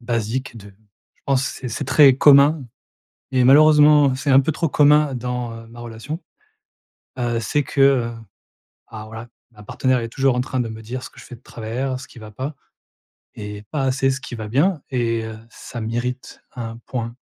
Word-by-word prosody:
basique 120 Hz, +1 st, -3 dB
de 100 Hz, -2 st, -11 dB, 0.5 s
je -, -, -39 dB
pense 135 Hz, -2 st, +2 dB
c'est 130 Hz, -, -5 dB
c'est 115 Hz, -, -4 dB
très 140 Hz, -4 st, +6 dB
commun 140 Hz, +1 st, +5 dB, 0.7 s
et 130 Hz, -1 st, +2 dB
malheureusement 150 Hz, 0 st, +6 dB
c'est 130 Hz, +2 st, -2 dB
un 135 Hz, 0 st, +7 dB
peu 150 Hz, +4 st, -1 dB
trop 165 Hz, +1 st, -1 dB
commun 150 Hz, -1 st, +4 dB
dans, 125 Hz, -1 st, -4 dB
heu, 115 Hz, -, -12 dB
ma 120 Hz, +1 st, -12 dB
relation, 120 Hz, +8 st, -7 dB, 1.0 s
heu, 120 Hz, -1 st, -1 dB
c'est 145 Hz, +7 st, 0 dB
que, 135 Hz, -, -1 dB
heu 130 Hz, -4 st, +3 dB, 0.8 s
alors 110 Hz, -1 st, -9 dB
voilà, 110 Hz, +2 st, -9 dB, 0.2 s
ma 105 Hz, -3 st, -16 dB
partenaire 130 Hz, +5 st, 0 dB
est 115 Hz, -, -4 dB
toujours 135 Hz, +2 st, +1 dB
en 125 Hz, -, 0 dB
train 130 Hz, 0 st, -2 dB
de 120 Hz, -, -2 dB
me 110 Hz, 0 st, -8 dB
dire 125 Hz, +4 st, -6 dB
ce -, -, -9 dB
que -, -, -20 dB
je -, -, -13 dB
fais -, -, -10 dB
de -, -, -24 dB
travers, 125 Hz, +4 st, -4 dB
ce 130 Hz, -, -11 dB
qui 125 Hz, -, -15 dB
va 110 Hz, -1 st, -11 dB
pas, 130 Hz, +8 st, -6 dB, 0.8 s
et 105 Hz, -1 st, -8 dB
pas 150 Hz, -3 st, -1 dB
assez 135 Hz, 0 st, +1 dB
ce 135 Hz, +1 st, -3 dB
qui 135 Hz, -2 st, -8 dB
va 110 Hz, -1 st, -6 dB
bien 145 Hz, -, +1 dB
et, 115 Hz, -3 st, -1 dB
heu, 110 Hz, -1 st, -8 dB
ça 120 Hz, 0 st, -9 dB
mérite 120 Hz, +3 st, -4 dB
un 115 Hz, -3 st, -6 dB
point. 115 Hz, -2 st, -4 dB
125 Hz, 200 wpm, -21 LUFS, 115-135 Hz, 1.0 s, un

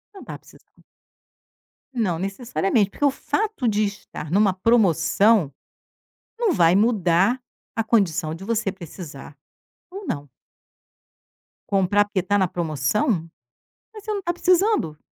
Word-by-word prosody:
Não 390 Hz, -, -10 dB
tá -, -, -8 dB
precisando. -, -, -22 dB, 1.1 s
Não 200 Hz, -9 st, -1 dB
necessariamente, 200 Hz, +1 st, 0 dB
porque 290 Hz, -, -1 dB
o 285 Hz, -, +4 dB
fato 415 Hz, -, -2 dB
de 215 Hz, -1 st, +2 dB
estar 195 Hz, -6 st, -7 dB
numa 200 Hz, +1 st, +3 dB
promoção 200 Hz, -3 st, +3 dB, 0.9 s
não 465 Hz, -4 st, +1 dB
vai 170 Hz, -, +4 dB
mudar 200 Hz, +1 st, +2 dB, 0.4 s
a 225 Hz, -, 0 dB
condição 180 Hz, -8 st, +1 dB
de 175 Hz, -, -10 dB
você 215 Hz, -1 st, -1 dB
precisar 165 Hz, -6 st, -10 dB, 0.6 s
ou 390 Hz, +2 st, -8 dB
não. 145 Hz, -1 st, -4 dB, 1.4 s
Comprar 200 Hz, +1 st, +3 dB
porque 205 Hz, -2 st, -2 dB
tá 205 Hz, +2 st, +1 dB
na 190 Hz, -2 st, +2 dB
promoção, 160 Hz, +1 st, -1 dB, 0.9 s
mas 425 Hz, -2 st, -11 dB
você 430 Hz, -, -3 dB
não 405 Hz, -, -3 dB
tá 345 Hz, -2 st, -2 dB
precisando. 360 Hz, -, +2 dB
205 Hz, 125 wpm, -23 LUFS, 175-240 Hz, 1.4 s, o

